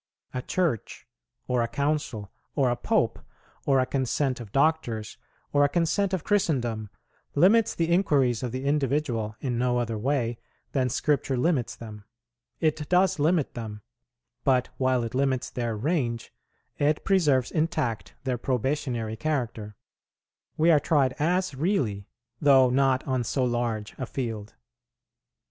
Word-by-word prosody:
A 125 - -2
Church, 160 - -2 0.4
or 125 -1 +1
a 115 - +1
Council, 130 -5 -2 0.2
or 135 -4 +3
a - - +1
Pope, - - 0 0.5
or 135 -2 +4
a 130 - +3
Consent 130 0 -1
of 115 -4 -9
Doctors, 135 -7 0 0.3
or 145 0 +5
a 145 - +4
Consent 175 +5 +1
of 185 -4 -1
Christendom, 120 - 0 0.5
limits 205 +9 +4
the 165 0 0
inquiries 140 - +2
of 125 -2 -3
the 130 +2 -4
individual 135 -6 0
in 125 -3 -1
no 125 0 +1
other 115 -3 -1
way 120 -2 0 0.3
than 130 -2 +1
Scripture 135 0 0
limits 130 -3 +1
them: 105 -3 -10 0.6
it 155 -2 0
does 180 -2 +3
limit 155 0 +2
them; 105 -3 -7 0.6
but, 130 -2 +2
while 130 -2 +2
it 115 0 -5
limits 130 -1 0
their 115 -3 -2
range, 120 -3 -1 0.5
it 150 +1 +1
preserves 150 -10 +3
intact 155 -8 -1
their 125 -2 -1
probationary 125 -3 -1
character; 115 -6 -3 0.8
we 165 +2 +5
are 155 - +6
tried 140 -4 +2
as 180 +3 +1
really, 130 - -1 0.3
though 135 -4 +6
not 130 0 +2
on 130 -2 0
so 130 +3 -1
large 120 -3 -2
a 130 - -3
field. 110 -6 -5
130 Hz, 140 wpm, -26 LUFS, 120-150 Hz, 0.8 s, are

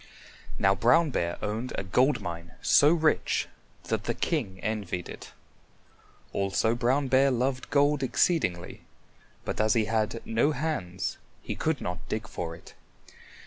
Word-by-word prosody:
Now 95 - +4
Brown 130 - +4
Bear 85 -6 -1
owned 110 +5 -3
a - - -3
gold 125 +8 +2
mine 85 -1 -6
so 145 - +6
rich 160 -2 +1 0.4
that - - -2
the - - -1
king 110 - -2
envied 100 -5 -3
it. - - -10 1.0
Also 100 +3 +1
Brown 125 +4 +1
Bear 135 +1 +4
loved 130 +1 -1
gold 145 0 +3
exceedingly, 125 - 0 0.6
but - - -1
as 110 +1 +3
he 110 -2 +2
had 110 +1 -1
no 120 +7 +2
hands 95 - -3 0.2
he - - -3
could 160 -2 -1
not 90 0 -5
dig 110 -1 -3
for 85 -7 -5
it. 85 - -15
115 Hz, 145 wpm, -28 LUFS, 95-140 Hz, 1.0 s, so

